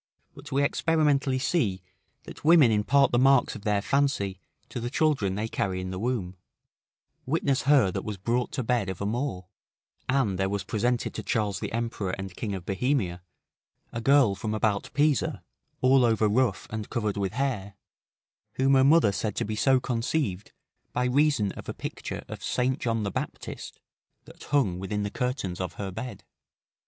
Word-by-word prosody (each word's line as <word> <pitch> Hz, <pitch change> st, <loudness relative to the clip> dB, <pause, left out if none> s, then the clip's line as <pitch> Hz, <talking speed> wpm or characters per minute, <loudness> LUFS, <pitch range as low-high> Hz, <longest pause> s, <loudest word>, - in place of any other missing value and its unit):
But -, -, -12 dB
we 140 Hz, +1 st, +2 dB
experimentally 145 Hz, -3 st, +2 dB
see 115 Hz, -, 0 dB, 0.4 s
that -, -, -11 dB
women 155 Hz, -6 st, +6 dB
impart 125 Hz, +7 st, +3 dB
the 120 Hz, -, +3 dB
marks 135 Hz, 0 st, +4 dB
of 110 Hz, -, -8 dB
their 100 Hz, -1 st, 0 dB
fancy 135 Hz, -10 st, 0 dB, 0.3 s
to -, -, -5 dB
the 120 Hz, +1 st, -3 dB
children 135 Hz, -11 st, +1 dB
they 105 Hz, +2 st, -2 dB
carry 95 Hz, -4 st, -2 dB
in 95 Hz, 0 st, -4 dB
the 95 Hz, -, -4 dB
womb; 105 Hz, -6 st, -2 dB, 0.9 s
witness 140 Hz, -2 st, +1 dB
her 130 Hz, -10 st, +5 dB
that -, -, -4 dB
was 105 Hz, -2 st, -5 dB
brought 120 Hz, +6 st, -1 dB
to 130 Hz, -, -1 dB
bed 115 Hz, -4 st, 0 dB
of 95 Hz, -, -5 dB
a 100 Hz, -, -2 dB
Moor; 110 Hz, -4 st, -2 dB, 0.6 s
and 125 Hz, -8 st, +1 dB
there 95 Hz, 0 st, +1 dB
was 100 Hz, -1 st, -2 dB
presented 120 Hz, +5 st, -1 dB
to -, -, -4 dB
Charles 105 Hz, -3 st, -1 dB
the -, -, -4 dB
Emperor 115 Hz, -5 st, -2 dB
and 95 Hz, -2 st, -7 dB
King 105 Hz, -3 st, -3 dB
of 90 Hz, -2 st, -7 dB
Bohemia, 100 Hz, -4 st, 0 dB, 0.7 s
a 115 Hz, -, -3 dB
girl 135 Hz, -4 st, +5 dB
from 105 Hz, +2 st, -3 dB
about 105 Hz, -2 st, 0 dB
Pisa, 145 Hz, -4 st, +1 dB, 0.4 s
all 130 Hz, 0 st, +5 dB
over 110 Hz, -2 st, +3 dB
rough 110 Hz, -2 st, +1 dB
and 110 Hz, -1 st, -5 dB
covered 105 Hz, -4 st, -1 dB
with 100 Hz, -1 st, -2 dB
hair, 110 Hz, -7 st, -2 dB, 0.8 s
whom 135 Hz, +1 st, +2 dB
her 130 Hz, -1 st, +6 dB
mother 140 Hz, -6 st, +5 dB
said 105 Hz, +1 st, -2 dB
to -, -, -1 dB
be 110 Hz, +1 st, -3 dB
so 130 Hz, +4 st, +3 dB
conceived 115 Hz, -, -2 dB, 0.4 s
by 125 Hz, -, 0 dB
reason 130 Hz, -5 st, +2 dB
of -, -, -9 dB
a -, -, -4 dB
picture -, -, -6 dB
of -, -, -8 dB
St. 130 Hz, +1 st, 0 dB
John 115 Hz, -2 st, -1 dB
the 100 Hz, -, -2 dB
Baptist, -, -, -6 dB, 0.5 s
that -, -, -13 dB
hung 125 Hz, -12 st, +1 dB
within 105 Hz, +2 st, -2 dB
the 105 Hz, -, -3 dB
curtains 125 Hz, -9 st, -2 dB
of 90 Hz, -2 st, -3 dB
her 100 Hz, -2 st, -5 dB
bed. 110 Hz, +1 st, -7 dB
115 Hz, 180 wpm, -27 LUFS, 100-135 Hz, 0.9 s, women